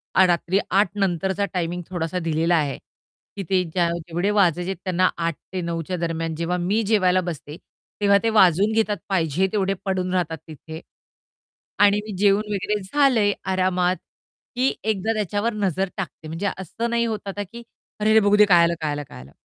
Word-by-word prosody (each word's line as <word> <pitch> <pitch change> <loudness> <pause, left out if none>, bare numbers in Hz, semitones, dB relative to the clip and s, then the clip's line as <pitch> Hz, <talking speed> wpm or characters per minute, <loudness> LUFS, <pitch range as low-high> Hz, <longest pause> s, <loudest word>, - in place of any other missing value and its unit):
आ 190 - +7
रात्री 175 +2 +1
08:00 195 -1 +3
नंतरचा 190 +1 0
टायमिंग 175 0 -2
थोडासा 175 0 -2
दिलेला 165 +1 +1
आहे 145 -4 0 0.6
की 195 - -4
ते 185 -1 +3
ज्या 170 0 0
जेवढे 175 +3 -2
वाजायचे 180 -3 +2
आहेत 190 - -3
त्यांना 185 -1 +2
8:00 165 -2 -1 0.2
ते 185 - -2
9:00च्या 170 +1 -3
दरम्यान, 165 -1 -2
जेव्हा 170 +2 -1
मी 190 +6 0
जेवायला 185 -4 +3
बसते, 160 -3 -6 0.4
तेव्हा 200 0 +5
ते 230 - +2
वाजवून 200 -1 +4
घेतात. 215 -2 +1
पाहिजे 180 -1 +1
तेवढे 195 -2 0
पडून 185 -1 -1
राहतात 170 -3 -1
तिथे. 160 +1 -9 1.0
आणि 205 0 +5
मी 210 - -5
जेवून 200 +1 +3
वगैरे 210 +2 -1
झाले 240 -2 +3 0.2
आरामात, 185 -1 +1 0.6
की 255 +2 +2
एकदा 220 +1 0
त्याच्यावर 210 +2 -1
नजर 195 -2 -1
टाकते. 175 -4 -6
म्हणजे 165 +6 -3
असं 210 +6 -4
नाही 235 0 +1
होत 215 -3 -4
आता 205 +1 -3
की 235 0 -9 0.4
"अरे, 210 +1 +1
अरे, 220 - +7
बघू 205 0 +3
दे, 210 0 +7
काय 175 -4 +6
आलं, 170 - +2
काय 155 -2 -1
आलं, 145 0 -3
काय - - -11
आलं!" 65 +2 -15
185 Hz, 180 wpm, -23 LUFS, 170-205 Hz, 1.0 s, आ